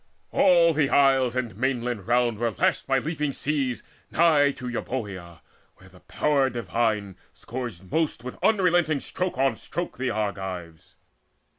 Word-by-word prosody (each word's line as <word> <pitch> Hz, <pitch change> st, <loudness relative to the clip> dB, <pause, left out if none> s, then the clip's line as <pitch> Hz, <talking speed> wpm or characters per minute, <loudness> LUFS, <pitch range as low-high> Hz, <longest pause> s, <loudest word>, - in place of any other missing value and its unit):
All 170 Hz, -3 st, +5 dB
the 145 Hz, -2 st, +1 dB
isles 135 Hz, -4 st, +3 dB
And 120 Hz, -6 st, -2 dB
mainlands 120 Hz, -4 st, -2 dB
round 120 Hz, -2 st, +2 dB
were 120 Hz, 0 st, +1 dB
lashed 105 Hz, -, 0 dB
by 135 Hz, 0 st, +3 dB
leaping 150 Hz, 0 st, -2 dB
seas 135 Hz, -4 st, -1 dB, 0.3 s
Nigh 155 Hz, -4 st, +4 dB
to 125 Hz, -, -8 dB
Euboea, 100 Hz, -9 st, -5 dB, 0.3 s
where 95 Hz, -, -18 dB
the 90 Hz, -1 st, -18 dB
Power 140 Hz, +3 st, +1 dB
divine 110 Hz, -4 st, -1 dB, 0.2 s
Scourged 115 Hz, -8 st, -7 dB
most 160 Hz, -7 st, 0 dB
with 125 Hz, -, -8 dB
unrelenting 175 Hz, -7 st, +3 dB
stroke 180 Hz, +2 st, -3 dB
on 135 Hz, 0 st, +2 dB
stroke 175 Hz, -6 st, -6 dB
The 130 Hz, -1 st, 0 dB
Argives. 95 Hz, -6 st, -5 dB
125 Hz, 140 wpm, -25 LUFS, 110-145 Hz, 0.3 s, All